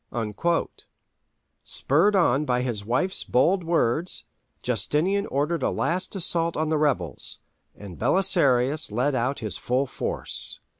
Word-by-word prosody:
" - - -11 1.5
Spurred 170 +10 +2
on 150 -6 +3
by 125 -3 0
his 115 -5 -1
wife's 130 - -1
bold 175 +9 +2
words, 165 0 0 0.4
Justinian 150 - 0
ordered 150 +5 -1
a - - +1
last 185 +4 -2
assault 170 -2 0
on 155 0 0
the 155 - +1
rebels, 110 - -1 0.4
and 100 -4 -10
Belisarius 145 - +2
led 125 +7 0
out 130 +2 -1
his 100 -5 -2
full 130 +3 0
force. - - -1
145 Hz, 130 wpm, -25 LUFS, 125-170 Hz, 1.5 s, on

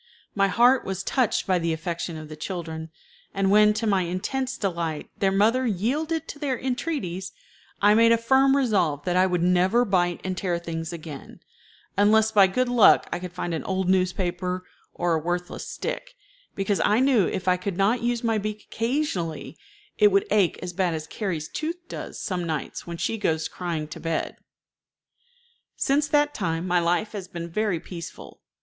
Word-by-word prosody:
My 195 -1 +3
heart 240 +6 +4
was 190 0 -4
touched 255 -1 +1
by 185 -2 +2
the 165 -1 0
affection 170 0 -4
of 155 0 -8
the 155 - -8
children, 160 -1 -5 0.5
and 195 0 +2
when, 210 +1 +6
to 225 - -2
my 200 -3 +2
intense 230 +10 -2
delight, 170 -6 -3
their 195 -1 +2
mother 225 +6 +3
yielded 300 - -1
to 290 - -7
their 275 -4 -1
entreaties, 245 - -3 0.5
I 205 +1 +7
made 230 +1 +5
a 230 - +5
firm 265 +4 +4
resolve 190 - +1
that 180 -1 0
I 185 +1 +4
would 180 -2 0
never 185 +7 +3
bite 175 -4 +1
and 185 0 -2
tear 180 -2 -1
things 165 -1 -5
again, 155 -4 -9 0.6
unless 220 +2 +4
by 200 -3 +6
good 255 +7 0
luck 245 -3 +5
I - - -2
could 180 -1 -7
find 175 -1 -4
an 160 - -3
old 190 -1 -1
newspaper 180 0 0 0.3
or 175 -1 0
a 160 - +2
worthless 175 +2 -3
stick, - - -5 0.4
because 195 0 0
I 210 +3 +3
knew 255 -8 +4
if 185 - -4
I 180 - +5
could 180 0 -4
not 210 +5 +2
use 240 0 -1
my 225 -2 +1
beak 210 +1 -5
occasionally, 195 - -2 0.4
it 210 - +7
would 200 -1 +3
ache 200 -4 +3
as 180 -1 -5
bad 180 -2 0
as 155 -1 -5
Carrie's 165 -5 -3
tooth 325 +3 -4
does - - -7
some 180 -2 -2
nights 155 0 -4
when 170 0 -5
she 210 +6 -2
goes 160 -5 0
crying 165 -4 -4
to - - -8
bed. 165 -1 -2 1.4
Since 285 +2 +1
that 295 0 +2
time 165 -3 -2
my 180 -1 +2
life 175 +5 0
has 200 -4 -6
been 170 -2 -6
very 205 -2 0
peaceful. 170 -1 -9
190 Hz, 180 wpm, -25 LUFS, 175-225 Hz, 1.4 s, I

